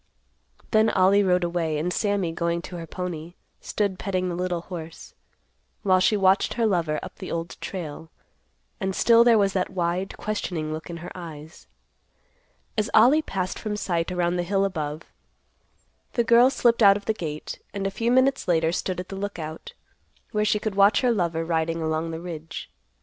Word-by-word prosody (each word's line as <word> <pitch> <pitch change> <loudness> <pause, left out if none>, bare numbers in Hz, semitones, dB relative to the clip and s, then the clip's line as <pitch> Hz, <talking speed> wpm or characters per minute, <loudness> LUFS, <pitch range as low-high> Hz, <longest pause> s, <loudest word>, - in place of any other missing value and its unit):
Then 220 0 +4
Ollie 190 +2 +4
rode 180 -2 +2
away, 170 -3 -1
and 175 +4 -1
Sammy, 200 -5 0
going 170 +1 -1
to 180 - -7
her 165 -1 -7
pony, 175 -1 -6 0.2
stood 200 -3 -2
petting 185 -2 -1
the 175 - -3
little 180 -1 -2
horse, 165 -2 -9 0.7
while 185 -2 +4
she 210 +3 +3
watched 195 0 +3
her 235 - +1
lover 170 -7 +1
up - - -9
the - - -7
Old 165 +1 -4
Trail, 160 -3 -6 0.7
and 190 0 -2
still 235 0 +6
there 235 -2 +5
was 200 -2 +2
that 185 -1 0
wide, 180 +1 -2
questioning 175 -7 -3
look 155 +2 -7
in 170 - -5
her - - -8
eyes. 160 -3 -10 1.1
As 215 -1 0
Ollie 255 +8 +6
passed 185 -10 -3
from 215 -2 -3
sight 175 -3 -1
around 175 0 0
the - - +1
hill 195 +2 +1
above, 155 -5 -3 1.1
the 235 - +2
girl 235 +2 +6
slipped 240 -3 +2
out 200 -1 +7
of 205 - -11
the 220 - +1
gate, 155 -7 -6
and 200 -1 -4
a 195 - 0
few 230 +4 -1
minutes 260 -1 +3
later 165 -2 +2
stood 180 +1 -2
at 180 - -6
the 195 - -6
Lookout, 170 -6 -6 0.6
where 210 0 +1
she 210 - +2
could 210 0 -3
watch 200 +1 +5
her 250 -2 +3
lover 170 -6 0
riding 165 0 0
along 160 0 -1
the 165 0 -5
ridge. 165 -2 -7
180 Hz, 180 wpm, -25 LUFS, 165-205 Hz, 1.1 s, out